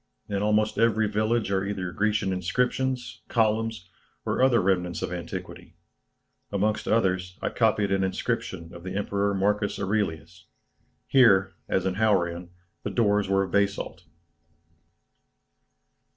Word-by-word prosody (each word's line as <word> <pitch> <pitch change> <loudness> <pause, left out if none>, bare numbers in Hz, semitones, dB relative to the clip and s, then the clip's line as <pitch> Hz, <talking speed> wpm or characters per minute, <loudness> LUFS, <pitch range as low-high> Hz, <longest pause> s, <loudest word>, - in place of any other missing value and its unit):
In 100 -1 -2
almost 105 +1 +1
every 110 -1 +3
village 110 +1 0
are 95 -1 +1
either 95 -3 -3
Grecian 105 -1 0
inscriptions, 125 +7 -1
columns, 110 -4 0 0.4
or - - 0
other 130 -3 +5
remnants 90 -2 0
of - - -3
antiquity; 85 0 -7 0.8
amongst 105 +2 0
others 95 -4 +1
I - - -1
copied 105 -3 +1
an 95 0 +2
inscription 95 -2 -3
of 85 - -10
the 95 +2 -6
Emperor 100 0 0
Marcus 100 +1 0
Aurelius. 95 -4 -2 0.6
Here, 100 -8 +5 0.2
as 95 -1 +1
in 95 0 -1
Hauran, 90 -5 +1 0.3
the - - -3
doors 105 -2 +1
were 95 0 +3
of 95 - -6
basalt." 100 0 -1
100 Hz, 125 wpm, -26 LUFS, 90-110 Hz, 0.8 s, other